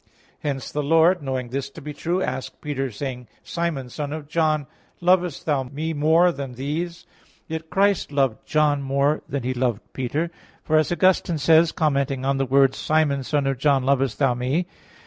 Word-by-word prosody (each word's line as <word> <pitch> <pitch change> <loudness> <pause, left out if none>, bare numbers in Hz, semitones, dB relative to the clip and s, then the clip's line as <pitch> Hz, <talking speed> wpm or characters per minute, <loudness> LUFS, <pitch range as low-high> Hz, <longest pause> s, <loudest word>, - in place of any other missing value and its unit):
Hence 140 -3 -3
the 150 - -1
Lord, 165 +4 +4
knowing 130 -3 -3
this 135 +2 -3
to 140 - -11
be 150 -1 -7
true, 175 +5 -1
asked 130 +1 -4
Peter, 135 -3 -3
saying: 125 +1 -6 0.2
"Simon, 170 -7 -3
son 145 +3 -5
of 155 -2 -6
John, 155 -2 +1 0.3
lovest 180 -3 +2
thou 145 -4 +1
Me 145 +5 -4
more 160 +4 +4
than 140 -5 -6
these?" 155 +7 -4 0.4
Yet 160 0 -5
Christ 200 -4 +2
loved 135 -5 0
John 150 -2 +2
more 140 +2 +1
than 140 -3 -3
He 130 +1 -1
loved 120 -3 0
Peter. 145 +6 -2 0.3
For 155 - 0
as 155 +1 +2
Augustine 175 -2 +2
says, 160 +3 +5
commenting 140 -4 0
on 135 0 +1
the 135 -1 0
words, 135 +1 +3
"Simon, 155 -3 +1
son 145 +1 0
of 135 -2 -1
John, 140 -2 +3
lovest 135 -4 +1
thou 135 -3 +3
Me?" 130 +8 -1
145 Hz, 180 wpm, -23 LUFS, 135-160 Hz, 0.4 s, says